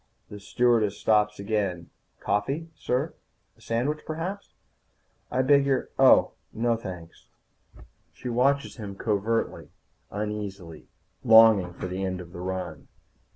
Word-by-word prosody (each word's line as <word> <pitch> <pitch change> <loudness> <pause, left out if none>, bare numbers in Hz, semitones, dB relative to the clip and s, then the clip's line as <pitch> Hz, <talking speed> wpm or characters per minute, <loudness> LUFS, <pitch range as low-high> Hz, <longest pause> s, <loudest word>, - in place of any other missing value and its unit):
The 105 -1 -9
stewardess 110 -1 +1
stops 105 -1 +2
again. 100 -4 -2 0.3
"Coffee, 140 +11 -2
sir? 135 +2 -2 0.4
A - - -26
sandwich, 130 +7 -1
perhaps?" 175 +6 -6 0.7
"I 130 +1 +1
beg 140 +1 +5
your 135 -2 0
Oh, - - +6 0.2
no. 120 +2 0
No, - - +3
thanks." 90 -6 -9 0.8
She - - -9
watches 135 +4 +1
him 100 -4 -7
covertly, 110 +2 -1 0.4
uneasily, 100 -5 -6 0.4
longing 110 -6 +6
for - - -7
the 90 +1 -4
end 95 -1 -2
of 85 -1 -10
the 85 - -7
run. 95 0 -5
105 Hz, 125 wpm, -26 LUFS, 95-125 Hz, 0.8 s, Oh